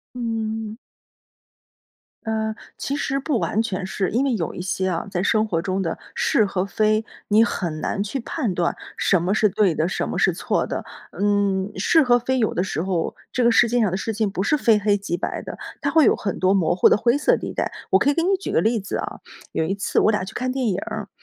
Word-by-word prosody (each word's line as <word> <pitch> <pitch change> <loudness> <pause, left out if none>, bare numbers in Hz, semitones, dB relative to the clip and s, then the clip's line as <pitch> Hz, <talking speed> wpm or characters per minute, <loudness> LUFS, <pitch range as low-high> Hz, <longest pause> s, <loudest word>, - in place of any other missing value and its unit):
嗯。 225 -2 -3 1.5
嗯， 220 0 -1 0.2
其 275 - -3
实 275 -1 -1
不 275 -2 -1
完 220 +1 0
全 190 -4 -3
是。 190 -1 -2
因 250 +6 +1
为 265 - +1
有 175 -7 -2
一 - - -7
些 190 +1 -1
啊， 170 +4 -2
在 180 -2 -1
生 215 +2 +2
活 165 -4 0
中 190 +1 -1
的 165 -3 -2 0.2
是 220 - +2
和 195 -2 -1
非， 215 +1 +1 0.3
你 215 +2 +5
很 170 -8 -1
难 200 - -1
去 215 +7 -3
判 235 - -2
断 170 -1 0 0.2
什 180 -4 +2
么 180 +3 0
是 215 0 +4
对 190 -3 +2
的， 160 - 0
什 - - -2
么 - - -3
是 - - +3
错 - - -1
的。 - - -4 0.3
嗯， 200 -1 +1
是 315 - +4
和 245 -3 +4
非 260 +2 -1
有 220 -3 +1
的 180 - 0
时 185 -4 -2
候， 180 -3 -1 0.2
这 255 - 0
个 235 - +5
世 235 0 +5
界 245 +1 +1
上 210 - +2
的 185 - -1
事 220 +2 -3
情 215 -1 0
不 190 - -2
是 300 +9 +2
非 225 -6 +4
黑 205 0 +2
即 195 -3 -3
白 - - -3
的， - - -7 0.2
它 - - 0
会 320 -2 +5
有 - - +5
很 200 -4 -3
多 185 +1 +3
模 175 -4 +2
糊 - - +6
的 - - +5
灰 240 +4 +2
色 290 - +3
地 - - -6
带。 - - -2 0.2
我 - - +5
可 285 - +3
以 - - +1
给 330 - +1
你 385 +3 +2
举 385 - -5
个 - - +3
例 225 +5 +2
子 195 - -4
啊， - - -5 0.3
有 - - 0
一 190 +5 -1
次 200 - -1
我 - - +4
俩 210 -3 0
去 - - -9
看 255 +1 -2
电 260 -1 -1
影 185 - 0
儿， - - -5
210 Hz, 265 characters per minute, -22 LUFS, 190-235 Hz, 1.5 s, 糊